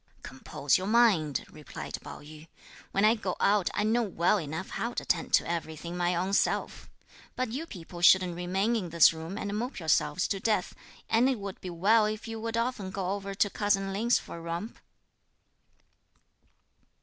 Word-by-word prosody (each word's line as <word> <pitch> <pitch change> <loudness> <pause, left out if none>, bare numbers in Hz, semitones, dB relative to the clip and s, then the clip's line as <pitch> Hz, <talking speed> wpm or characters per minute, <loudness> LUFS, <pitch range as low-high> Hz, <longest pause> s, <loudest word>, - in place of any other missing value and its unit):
"Compose 135 +3 -1
your 190 - -4
mind," 205 - +3
replied 150 -2 -8
Pao - - -10
yü; 155 +1 -13 0.4
"when 200 +2 +2
I 220 - +6
go 205 -5 -3
out, 200 -2 +3
I 210 - +1
know 225 +3 +2
well 200 -1 +1
enough 160 +4 -5
how 235 +1 -3
to - - -3
attend 170 - -1
to - - +1
everything 170 0 -4
my 175 0 0
own 185 +3 -1
self. - - 0 0.5
But 255 -2 -2
you 295 +8 -4
people 175 - -10
shouldn't 180 0 +5
remain 190 +6 0
in 190 -6 -2
this 165 0 +6
room, 165 +5 -7
and 205 0 -3
mope 245 +5 -3
yourselves 175 +2 +1
to 195 - -1
death; 210 -2 0 0.3
and 235 +4 +3
it 260 - 0
would 200 -2 -7
be 185 - -6
well 210 +6 +3
if 215 +2 -5
you 225 0 -5
would 230 +1 -3
often 230 -5 -2
go 190 -1 -3
over 200 0 -4
to 205 - +2
cousin 195 -2 0
Lin's 230 +5 +2
for - - -8
a - - -9
romp." 170 +7 -5
195 Hz, 185 wpm, -29 LUFS, 170-220 Hz, 0.5 s, I